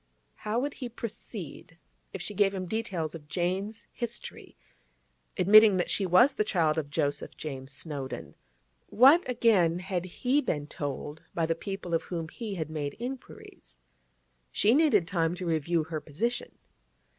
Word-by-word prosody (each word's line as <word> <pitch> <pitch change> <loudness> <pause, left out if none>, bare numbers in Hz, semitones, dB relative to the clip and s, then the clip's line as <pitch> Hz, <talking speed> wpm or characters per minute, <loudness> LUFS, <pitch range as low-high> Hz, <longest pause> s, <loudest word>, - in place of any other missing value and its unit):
How 215 +2 -2
would 285 +3 -2
he 250 -3 -6
proceed 205 - -8 0.3
if 190 - -5
she 210 - -3
gave 200 0 +2
him 185 -1 -3
details 180 -6 -2
of 155 -3 -10
Jane's 190 +6 -2
history, 235 -1 -6 0.8
admitting 210 +1 +7
that 180 - 0
she 195 - +1
was 210 +11 +6
the 215 - +1
child 165 -6 +2
of 145 -2 -5
Joseph 145 0 -2
James 135 -3 -6
Snowdon? 140 -2 -5 0.5
What, 275 +9 +7
again, 195 -9 +3
had 180 -1 -3
he 250 +10 +1
been 150 - -2
told 145 +1 -5
by 165 - +1
the 165 - +1
people 195 0 -6
of 165 - +2
whom 165 -3 -5
he 215 +1 -6
had 160 -3 -4
made 145 -2 -3
inquiries? 240 - -9 0.7
She 215 +3 +4
needed 285 - +4
time 165 -2 0
to 180 0 -6
review 165 0 +1
her 155 -1 -5
position. 225 +12 -3
180 Hz, 155 wpm, -29 LUFS, 160-215 Hz, 0.8 s, admitting